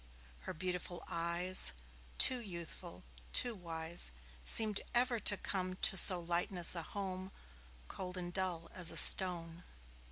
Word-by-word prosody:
Her - - -7
beautiful 180 0 -8
eyes, 170 +2 -1 0.4
Too 255 - +4
youthful, 170 - -11 0.3
too 245 - +1
wise, 165 - -4 0.3
Seemed 215 - +1
ever 240 -1 -2
to 205 0 +3
come 185 -2 -6
To 190 - -1
so 185 -1 +4
lightless 175 +1 0
a 170 - -4
home, 190 +1 -10 0.6
Cold 180 - -10
and 175 -1 -9
dull 180 -3 -5
as 175 -2 +2
a - - -1
stone. 175 -2 +7
180 Hz, 130 wpm, -31 LUFS, 170-190 Hz, 0.6 s, stone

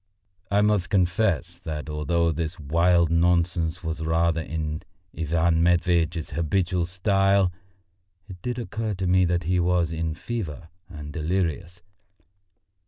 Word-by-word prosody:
I 100 0 +3
must 105 -3 +2
confess 90 -2 +1
that 75 -1 -5
although 85 +2 0
this 80 +1 -4
wild 85 +3 +2
nonsense 85 0 +1
was 80 0 -3
rather 80 +1 +1
in 80 -1 -4 0.3
Ivan 80 +1 +1
Matveitch's 85 -1 +1
habitual 85 +1 0
style, 95 0 +2 0.8
it 90 -4 -11
did 125 +3 -3
occur 110 -3 -3
to 95 +1 -3
me 90 +1 +4
that 85 0 0
he 90 +2 +1
was 85 -1 +1
in 80 -1 -2
a - - -11
fever 90 -8 -5 0.2
and 75 -4 -8
delirious. 85 +1 -2
85 Hz, 130 wpm, -25 LUFS, 80-90 Hz, 0.8 s, me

